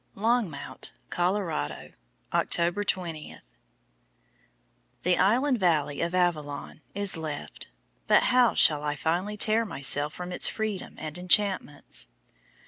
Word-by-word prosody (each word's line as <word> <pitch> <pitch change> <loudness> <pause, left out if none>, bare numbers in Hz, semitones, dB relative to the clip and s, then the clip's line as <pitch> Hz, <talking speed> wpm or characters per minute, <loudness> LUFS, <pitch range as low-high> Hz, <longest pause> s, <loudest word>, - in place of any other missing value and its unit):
LONGMOUNT, 220 -6 -1 0.2
COLORADO, 175 - -1 0.4
October 175 +4 +1
20. 170 -6 -2 1.7
"The 180 -1 +3
Island 250 +5 +3
Valley 150 -6 +1
of 170 +1 -1
Avillon" 155 -5 -1
is 200 -2 0
left, 155 -2 -6 0.4
but - - +5
how 250 -2 +4
shall 150 -2 +5
I 150 0 -2
finally 180 +8 -1
tear 220 +2 +2
myself 145 -6 -1
from 180 0 -6
its 180 - +3
freedom 215 -4 -3
and 155 +2 -5
enchantments? 185 -5 +1
180 Hz, 110 wpm, -27 LUFS, 155-205 Hz, 1.7 s, but